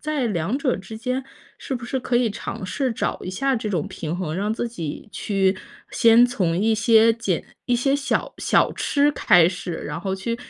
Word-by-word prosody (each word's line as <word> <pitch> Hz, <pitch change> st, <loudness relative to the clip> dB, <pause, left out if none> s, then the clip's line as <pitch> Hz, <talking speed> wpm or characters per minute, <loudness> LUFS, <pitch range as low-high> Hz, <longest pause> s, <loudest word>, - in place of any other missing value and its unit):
在 300 Hz, -4 st, -1 dB
两 200 Hz, +4 st, -1 dB
者 280 Hz, -3 st, +1 dB
之 220 Hz, +3 st, -9 dB
间 255 Hz, +2 st, -2 dB, 0.3 s
是 -, -, -7 dB
不 240 Hz, -2 st, -3 dB
是 260 Hz, +2 st, -2 dB
可 240 Hz, 0 st, 0 dB
以 240 Hz, -2 st, +2 dB
尝 195 Hz, -2 st, -6 dB
试 260 Hz, +5 st, -1 dB
找 -, -, -2 dB
一 180 Hz, -, -5 dB
下 270 Hz, +8 st, 0 dB
这 220 Hz, -2 st, -3 dB
种 175 Hz, -6 st, -1 dB
平 165 Hz, +2 st, -5 dB
衡， 165 Hz, -4 st, -3 dB
让 205 Hz, +3 st, -1 dB
自 240 Hz, -, -2 dB
己 170 Hz, -3 st, -6 dB
去， 195 Hz, -2 st, 0 dB, 0.4 s
先 230 Hz, +1 st, +6 dB
从 180 Hz, -9 st, -1 dB
一 220 Hz, +1 st, +3 dB
些 225 Hz, 0 st, +5 dB
减 210 Hz, -7 st, -2 dB, 0.2 s
一 245 Hz, -, +2 dB
些 270 Hz, +3 st, +1 dB
小 285 Hz, -1 st, -1 dB
小 -, -, +2 dB
吃 290 Hz, 0 st, +1 dB
开 175 Hz, -9 st, +5 dB
始。 180 Hz, -2 st, -5 dB
然 150 Hz, 0 st, -5 dB
后 190 Hz, +1 st, -3 dB
去 230 Hz, +5 st, -3 dB
225 Hz, 215 characters per minute, -23 LUFS, 185-245 Hz, 0.4 s, 先